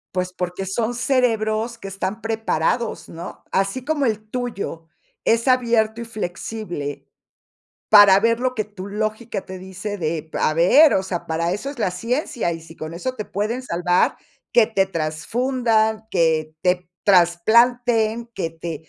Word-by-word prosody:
Pues 180 0 -1
porque 180 +1 -4
son 220 +5 -1
cerebros 235 -3 +1
que 195 -3 -8
están 195 +3 -4
preparados, 225 0 -1
¿no?, 170 +2 -9
así 195 +6 0
como 290 -2 0
el 215 -1 -2
tuyo 210 -10 -4 0.4
es 230 +2 +3
abierto 230 -3 +2
y 235 - -5
flexible 180 -7 -5 0.9
para 205 -2 +9
ver 230 +1 +2
lo 255 0 0
que 215 - -1
tu 200 -2 -9
lógica 215 0 -3
te 185 0 -8
dice 190 +2 -6
de 160 -1 -2
p 160 - -7
a 155 - +2
ver, 270 - +6
o 190 - +2
sea, 185 -2 -4
para 165 +2 -1
eso 205 +8 -4
es 280 -3 -7
la 200 - +1
ciencia, 230 - -2
y 165 - -9
sí 165 0 -13
con 155 +1 -7
eso 255 +9 -3
te 215 - -5
pueden 215 +6 -2
salvar, 180 -4 +1 0.3
que 230 -3 +5
te 195 -4 +1
trasfundan, 220 - 0
que 160 -3 +1
te 180 -1 +1 0.2
trasplanten, 225 +5 +3
que 165 -4 -2
te 160 -1 -7
210 Hz, 160 wpm, -22 LUFS, 175-230 Hz, 0.9 s, para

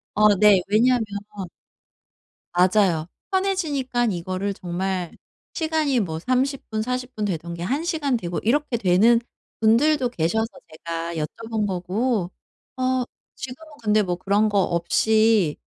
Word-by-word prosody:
어 210 -1 +5
네 205 -3 +6
왜냐하면 230 +2 +3 1.5
맞아요. 180 -3 +3 0.2
편해지니까 305 -11 0
이거를 185 +2 -3
정말 180 0 -3 0.4
시간이 315 -5 +1
뭐 160 -6 -2
30 255 - -1
분 215 0 -1
40 250 +1 -3
분 215 - -3
되던 170 -3 -3
게 170 - -7
1 275 - -1
시간 290 -6 0
되고 175 -6 -4
이렇게 270 +2 +1
되는 220 +4 +4 0.4
분들도 250 +4 +3
계셔서 220 +4 0 0.2
제가 165 +1 -5
여쭤본 215 +7 -3
거고 190 +2 -1 0.5
어 255 -1 +1 0.3
지금은 265 +5 -9
근데 215 0 +3
뭐 180 -3 -2
그런 200 +4 +2
거 205 -1 +1
없이 205 +1 +2
215 Hz, 235 characters per minute, -23 LUFS, 180-255 Hz, 1.5 s, 네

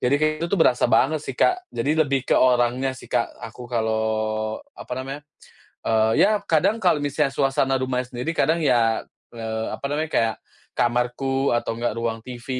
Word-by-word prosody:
Jadi 125 +3 +2
kayak 155 +1 +2
gitu 170 +3 0
tuh 195 - -1
berasa 125 -1 +3
banget 155 +5 +3
sih, 135 - -6
Kak, 365 0 +3
jadi 155 +3 -1
lebih 140 -3 +1
ke - - 0
orangnya 125 +1 +2
sih, - - -12
Kak, - - +1
aku 125 - -8
kalau, 110 -2 -1 0.2
apa - - -8
namanya, 135 +2 -6 0.6
eee, 110 0 +3
ya 210 +1 +4
kadang 165 +8 +2
kalau 170 -7 +2
misalnya 145 -1 0
suasana 135 -1 +1
rumahnya 125 -1 -2
sendiri 125 +7 -2
kadang 165 0 +1
ya, 115 -5 +2 0.3
eee, 110 -1 -4
apa - - -10
namanya, 155 +1 -2
kayak 115 -1 +2 0.4
kamarku 125 +3 0
atau 120 -1 0
enggak 120 0 -2
ruang 115 -1 -3
TV 120 0 -10
125 Hz, 175 wpm, -23 LUFS, 115-145 Hz, 0.6 s, ya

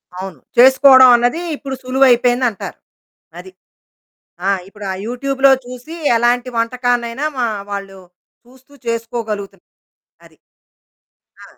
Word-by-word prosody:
అవును. 185 -4 -8 0.2
చేసుకోవడం 260 +1 +7
అన్నది 245 +7 0
ఇప్పుడు 275 -2 -7
సులువయిపోయిందంటారు. 250 -3 +1 0.6
అది. 375 - -11 1.0
ఆ! - - +3 0.2
ఇప్పుడు 205 +1 -12
ఆ - - -4
యూట్యూబ్‌లో 270 +3 +1
చూసి 250 +6 -10 0.2
ఎలాంటి 240 +2 +1
వంటకానైనా 245 +2 -1
మా 245 - +1 0.2
వాళ్ళు 195 -1 -7 0.5
చూస్తూ 260 +3 -22
చేసుకోగలుగుతున్ 220 -4 -5 0.6
అది. - - -21 1.1
ఆ! - - -12
245 Hz, 100 wpm, -17 LUFS, 230-260 Hz, 1.1 s, చేసుకోవడం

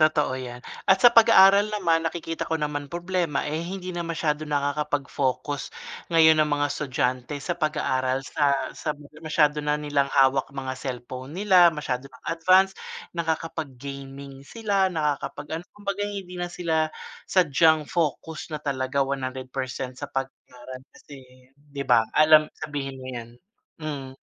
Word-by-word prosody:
Totoo 155 -3 +3
yan 125 -1 -7 0.3
at 190 - +5
sa - - +12
pag-aaral 205 -3 +7
naman 170 -6 +2
nakikita 165 0 -3
ko 160 - +1
naman 145 -1 -3
problema, 175 -3 -1
eh, 155 +2 -2
hindi 185 0 -5
na 175 - -4
masyadong 155 -2 -2
nakakapag-focus 145 -1 -1 0.4
ngayon 160 -1 +6
ang 150 - +3
mga 145 0 +2
estudyante 130 -2 -2
sa 175 +4 -3
pag-aaral. 130 -4 0
Sa 145 +1 +1 0.2
sa 150 - -2 0.3
masyado 150 -1 +2
na 150 0 +1
nilang 145 -2 +1
hawak 135 0 +4
mga 135 -1 -4
cellphone 130 +1 -6
nila, 185 -4 +6
masyado 135 -3 -4
ng 130 - -18
advanced. 185 +3 +4 0.4
Nakakapag-gaming 140 -4 -5
sila 200 0 0
nakakapag 150 0 -2
ano - - -15
kumbaga 205 0 -3
hindi 195 -3 -6
na 175 - -2
sila 160 -3 0 0.4
sadyang 160 -3 +3
focus 160 -1 -2
na 150 - -3
talaga 135 -1 -1
100% 130 -1 -4
sa - - -6
pag-aaral 130 -1 -6
kasi 140 -3 -13 0.3
'di 145 -1 -7
ba, 115 -2 +5
alam 155 0 +6 0.2
sabihin 140 -2 -4
mo 130 - -9
'yan, 120 -1 -6 0.5
mm. 135 -4 -6
150 Hz, 140 wpm, -25 LUFS, 135-165 Hz, 0.5 s, sa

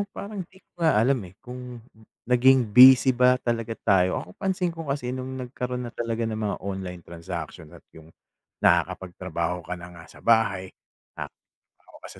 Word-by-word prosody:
parang 200 -1 -7
'di 190 - -20
ko 175 - -25
nga 160 -8 +3
alam, 125 +4 +3
eh, 90 - -18
kung 125 0 -8 0.5
naging 125 -1 +4
busy 130 +1 +8
ba 125 +1 +4
talaga 115 -1 -2
tayo. 95 -2 +2
Ako, 90 - -13
pansin 185 -2 -1
ko 165 -2 -8
kasi 135 -3 -2
nung 130 0 -5
nagkaroon 125 0 -4
na - - -12
talaga 115 0 -3
ng 110 -1 -3
mga 105 -2 -2
online 95 -2 -5
transaction 85 -1 -8
at - - -15
yung 80 0 -15 0.5
nakakapagtrabaho 90 -1 0
ka 90 - -4
na 90 0 -10
nga 85 -1 -13
sa - - -16
bahay. 110 -5 +2 0.5
Nakahawak - - -13
ka - - -11
115 Hz, 165 wpm, -25 LUFS, 90-130 Hz, 0.5 s, busy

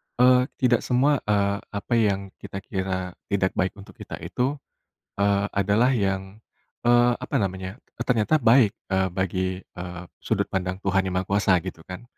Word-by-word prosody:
eee, 125 +1 +6
tidak 120 -2 +3
semua, 135 +3 +2
eee, 100 -1 +2
apa 100 +3 -5
yang 100 -3 0
kita 95 -1 -7
kira 95 -1 -3 0.2
tidak 95 -1 +1
baik 95 0 -1
untuk 100 -1 -14
kita - - -7
itu, 130 +4 -1 0.6
eee, 100 0 +2
adalah 105 +7 +2
yang, 95 -1 -2 0.5
eee, 120 0 +5
apa - - -3
namanya, 95 +3 -4 0.2
e - - -3
ternyata 120 +4 +2
baik, 120 -5 +4 0.2
eee, 95 0 +2
bagi, 95 0 -1
eee, 90 0 -8 0.2
sudut - - 0
pandang 90 -1 -1
Tuhan 95 -1 +1
Yang 90 - -4
Maha 90 - 0
Kuasa 100 0 +3
gitu - - -6
kan. 90 +5 -7
100 Hz, 165 wpm, -25 LUFS, 95-120 Hz, 0.6 s, eee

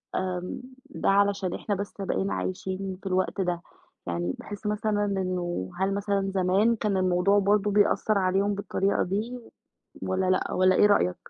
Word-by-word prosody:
آمم 180 +3 -3 0.3
ده - - -1
علشان 200 -2 +2
إحنا 205 - -2
بس 200 +1 -5
بقينا 100 - -1
عايشين 185 - -3
في - - -7
الوقت 185 +1 0
ده؟ 175 -2 -1 0.5
يعني 85 +1 -1
باحس 205 +1 -9
مثلًا 210 0 0
إنه 180 - -2
هل 195 +1 +1
مثلًا 200 -1 -1
زمان 195 +5 +3
كان 210 -3 -1
الموضوع 185 +2 +3
برضو 205 +1 +2
بيأثّر 205 +1 +3
عليهم 195 +2 +1
بالطريقة 200 0 0
دي، 220 +7 -3 0.6
والَّا 190 0 0
لأ، 185 - +1
والَّا 185 0 +4
إيه - - +5
رأيك؟ 90 - +3
195 Hz, 155 wpm, -27 LUFS, 185-205 Hz, 0.6 s, إيه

